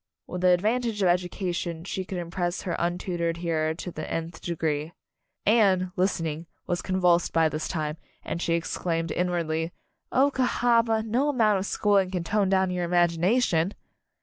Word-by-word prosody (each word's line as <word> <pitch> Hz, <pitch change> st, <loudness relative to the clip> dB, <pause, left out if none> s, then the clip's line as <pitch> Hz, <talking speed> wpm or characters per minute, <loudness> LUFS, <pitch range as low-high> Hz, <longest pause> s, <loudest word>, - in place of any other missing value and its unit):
With 180 Hz, -, -5 dB
the 185 Hz, -, +4 dB
advantage 215 Hz, +4 st, +2 dB
of -, -, +4 dB
education 175 Hz, -2 st, -1 dB
she 190 Hz, 0 st, -4 dB
could 190 Hz, -, -5 dB
impress 175 Hz, +1 st, -3 dB
her 180 Hz, -, -2 dB
untutored 175 Hz, -1 st, -1 dB
hearer 160 Hz, -2 st, -1 dB
to 180 Hz, +1 st, -6 dB
the 155 Hz, -, -6 dB
nth 165 Hz, +1 st, -4 dB
degree. 160 Hz, -2 st, -2 dB, 0.5 s
Anne, 195 Hz, -4 st, +4 dB
listening, 165 Hz, -4 st, -1 dB, 0.2 s
was 175 Hz, -1 st, -1 dB
convulsed 180 Hz, -2 st, +2 dB
by 165 Hz, -1 st, +4 dB
this 155 Hz, +1 st, -3 dB
time, 155 Hz, -2 st, -3 dB, 0.3 s
and 170 Hz, -, -3 dB
she 170 Hz, -, +1 dB
exclaimed 165 Hz, 0 st, -2 dB
inwardly, 170 Hz, -2 st, -1 dB, 0.4 s
"Oh, 275 Hz, +2 st, +4 dB
Cahaba, 235 Hz, -3 st, +2 dB
no 245 Hz, +7 st, +1 dB
amount 220 Hz, -7 st, +3 dB
of 190 Hz, -, -3 dB
schooling 200 Hz, -3 st, +2 dB
can 180 Hz, -2 st, -2 dB
tone 200 Hz, +2 st, +1 dB
down 190 Hz, -1 st, +2 dB
your 180 Hz, -1 st, -1 dB
imagination!" 175 Hz, +2 st, +2 dB
180 Hz, 155 wpm, -26 LUFS, 170-195 Hz, 0.5 s, the